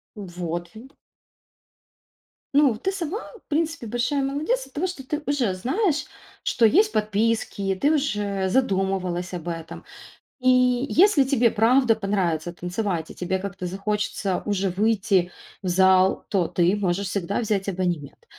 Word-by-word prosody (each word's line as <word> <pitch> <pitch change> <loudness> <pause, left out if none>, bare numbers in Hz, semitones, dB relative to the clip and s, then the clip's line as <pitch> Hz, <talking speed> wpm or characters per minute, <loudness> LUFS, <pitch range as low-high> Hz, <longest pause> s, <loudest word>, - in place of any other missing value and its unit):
Вот 175 -3 -5
ви 225 +4 -11 1.7
Ну, 280 -6 +4
ты 380 - -1
сама, 380 +1 -3 0.3
в - - -56
принципе, 320 -4 -1
большая 245 +5 0
молодец 305 - -1
от - - -23
того, 335 +6 -1
что 355 -7 -7
ты 300 +3 -3
уже 265 -9 0
знаешь, 295 - 0 0.4
что 235 - +2
есть 415 - +4
подписки, 210 -2 0
ты 290 - +4
уже 205 -9 -1
задумывалась 190 -5 0
об 175 -1 -6
этом. 165 -1 -6 0.6
И 255 0 +2 0.4
если 365 -5 +5
тебе 255 -4 +2
правда 230 +2 +4
понравится 180 -6 -1
танцевать, 180 -1 -3
и - - -12
тебе 185 +1 -1
как-то 190 -1 -6
захочется 195 0 -2
уже 200 -2 0
выйти 195 -2 +1 0.3
в 190 - -5
зал, 190 +1 +4
то 185 -5 +1
ты 175 +2 +2
можешь 195 -1 -1
всегда 200 +2 -2
взять 205 -4 -1
абонемент. 175 -6 -3
205 Hz, 140 wpm, -24 LUFS, 185-265 Hz, 1.7 s, если